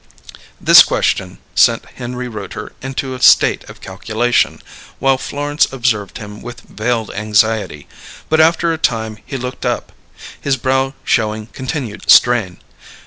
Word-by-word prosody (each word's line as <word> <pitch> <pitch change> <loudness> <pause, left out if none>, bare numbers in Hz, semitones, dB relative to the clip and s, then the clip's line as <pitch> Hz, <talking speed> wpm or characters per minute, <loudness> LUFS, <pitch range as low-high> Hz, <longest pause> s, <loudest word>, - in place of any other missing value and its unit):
This - - +8
question - - 0 0.2
sent - - +3
Henry 125 +1 -7
Rooter 105 -1 -7
into 135 0 -4
a 130 - -8
state - - +5
of - - -13
calculation, 110 +5 -1 0.4
while 135 -1 +1
Florence 145 +4 -1
observed 115 -6 -1
him 105 -2 -10
with 120 0 -9
veiled 110 0 -3
anxiety; 105 -6 0 0.4
but 160 0 +3
after 165 +1 +3
a 160 - -5
time 110 -5 -1
he 135 - -6
looked 125 0 -6
up, - - -2 0.5
his 140 -1 0
brow 135 +2 0
showing 110 -1 -1
continued 130 -4 -5
strain. 115 -8 +5
120 Hz, 135 wpm, -16 LUFS, 110-135 Hz, 0.5 s, This